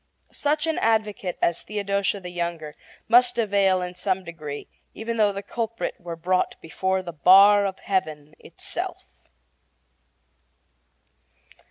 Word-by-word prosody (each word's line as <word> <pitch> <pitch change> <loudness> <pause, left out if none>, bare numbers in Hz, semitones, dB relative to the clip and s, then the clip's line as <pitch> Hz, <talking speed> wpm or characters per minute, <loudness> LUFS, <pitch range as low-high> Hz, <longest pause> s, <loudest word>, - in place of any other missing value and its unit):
Such 300 +2 0
an 320 -1 -1
advocate 215 -5 0
as 170 - +1
Theodosia 200 -1 -1
the 180 -1 -7
younger 170 -3 -4 0.3
must 245 +1 +5
avail 200 -4 +2
in 180 0 -5
some 185 +1 -2
degree, 155 -4 -7 0.3
even 230 +1 -4
though 210 -2 +4
the 200 0 -6
culprit 230 +1 -3
were 175 -2 -6
brought 180 +3 -1
before 190 +3 -2
the 170 -2 -7
bar 195 +6 +6
of 190 - -5
Heaven 155 -6 -3
itself. - - -6
190 Hz, 125 wpm, -24 LUFS, 175-210 Hz, 0.3 s, bar